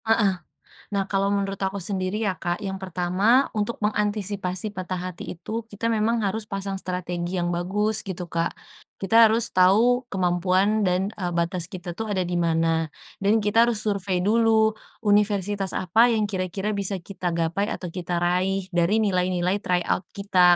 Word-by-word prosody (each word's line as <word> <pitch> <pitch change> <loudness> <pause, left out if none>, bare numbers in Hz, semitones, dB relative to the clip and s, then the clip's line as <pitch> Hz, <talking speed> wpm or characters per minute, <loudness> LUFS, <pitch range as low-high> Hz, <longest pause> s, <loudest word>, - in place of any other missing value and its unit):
Heeh. 220 -3 +3 0.6
Nah 195 - +2
kalau 195 0 +1
menurut 195 -1 -1
aku 195 +1 -2
sendiri 190 +3 -1
ya 195 -3 -1
Kak, 175 +3 -3
yang 190 -1 -4
pertama, 190 +8 +2
untuk 215 +2 -2
mengantisipasi 205 -2 -1
patah 185 -2 -4 0.2
hati 175 - -8
itu, 225 +6 -6
kita 225 +2 -2
memang 225 +1 +1
harus 210 +2 -2
pasang 195 -1 -4
strategi 180 -1 -3
yang 175 -1 0
bagus 200 +5 +1
gitu 190 -3 -4
Kak. 165 0 -1 0.4
Kita 225 +4 +5
harus 225 +1 +2
tau 230 +7 +4
kemampuan 185 +2 +1
dan, 185 +3 0
eee, 180 -2 -2
batas 170 0 0
kita 180 -2 -7
tuh 220 +6 -5
ada 185 - +1
di 175 0 -2
mana. 165 -1 +1 0.3
Dan 210 +2 +2
kita 225 +3 +4
harus 225 -3 0
survei 195 -3 -1
dulu, 220 +1 +4 0.3
universitas 205 -2 +1
apa 220 +7 +4
yang 225 -3 +1
kira-kira 190 +2 -2
bisa 200 -1 -1
kita 180 -2 -4
gapai 170 +5 0
atau 180 -6 -5
kita 175 0 -3
raih, 185 +2 0
dari 175 +5 +2
nilai-nilai 185 -1 +1
try 180 -3 0
out 180 - -1
kita. 185 -3 +4
195 Hz, 165 wpm, -24 LUFS, 180-210 Hz, 0.6 s, Kita